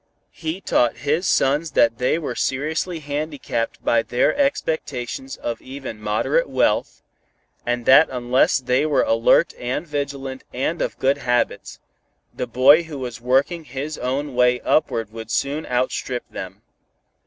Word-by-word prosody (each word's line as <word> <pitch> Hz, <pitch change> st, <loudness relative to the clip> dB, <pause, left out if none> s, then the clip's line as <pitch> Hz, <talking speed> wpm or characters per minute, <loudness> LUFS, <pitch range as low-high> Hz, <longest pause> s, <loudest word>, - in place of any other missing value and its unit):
He 165 Hz, +3 st, -5 dB
taught 120 Hz, -9 st, +1 dB
his 160 Hz, +6 st, +1 dB
sons 145 Hz, +3 st, +2 dB
that 115 Hz, 0 st, +3 dB
they 125 Hz, +5 st, +2 dB
were 165 Hz, -, -4 dB
seriously 160 Hz, +5 st, -2 dB
handicapped 145 Hz, -5 st, -3 dB
by 115 Hz, -, +3 dB
their 120 Hz, +2 st, +1 dB
expectations 145 Hz, -, -2 dB
of 115 Hz, -1 st, -4 dB
even 130 Hz, -5 st, -8 dB
moderate 110 Hz, -, 0 dB
wealth, -, -, 0 dB, 0.6 s
and 120 Hz, -1 st, -1 dB
that 145 Hz, +4 st, +7 dB
unless 125 Hz, 0 st, +2 dB
they 130 Hz, +2 st, +1 dB
were 150 Hz, -2 st, +2 dB
alert 115 Hz, 0 st, +3 dB
and 125 Hz, +6 st, -3 dB
vigilant 140 Hz, -3 st, -4 dB
and 155 Hz, +6 st, -1 dB
of -, -, -2 dB
good 135 Hz, +2 st, +1 dB
habits, 120 Hz, -2 st, -1 dB, 0.5 s
the 125 Hz, -, -4 dB
boy 135 Hz, +7 st, +6 dB
who 160 Hz, -3 st, -8 dB
was 125 Hz, -3 st, -6 dB
working 135 Hz, +7 st, +1 dB
his 140 Hz, +3 st, -5 dB
own 135 Hz, +3 st, -2 dB
way 125 Hz, 0 st, +3 dB
upward 115 Hz, -8 st, 0 dB
would 110 Hz, -1 st, -8 dB
soon 140 Hz, +6 st, -1 dB
outstrip 125 Hz, 0 st, -2 dB
them. -, -, -8 dB
135 Hz, 145 wpm, -22 LUFS, 125-150 Hz, 0.6 s, that